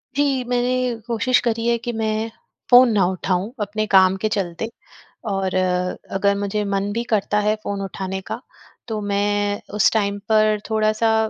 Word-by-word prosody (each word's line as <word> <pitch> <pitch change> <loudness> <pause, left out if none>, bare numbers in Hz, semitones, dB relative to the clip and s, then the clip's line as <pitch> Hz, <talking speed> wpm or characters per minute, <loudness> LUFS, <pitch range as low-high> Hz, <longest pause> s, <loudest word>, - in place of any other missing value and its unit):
जी, 275 -3 +1
मैंने 250 0 0
कोशिश 240 +2 +2
करी 230 -1 0
है 235 0 +3
कि 240 - -1
मैं 220 0 -1 0.4
फ़ोन 245 0 +8
ना 195 -3 +3
उठाऊँ 185 +2 -1
अपने 210 +1 -1
काम 190 0 +6
के - - +3
चलते। 190 +2 -3 0.6
और 195 -1 -1 0.6
अगर 200 +1 +2
मुझे 205 +1 -1
मन 200 0 -1
भी 235 +2 -2
करता 210 0 +1
है 215 - +3
फ़ोन 200 -1 -3
उठाने 190 0 -4
का - - -3 0.5
तो 220 -2 -2
मैं 205 0 0
उस 210 - +4
टाइम 205 -2 0
पर 215 -1 +3
थोड़ा-सा 220 +1 +2
210 Hz, 160 wpm, -21 LUFS, 200-230 Hz, 0.6 s, फ़ोन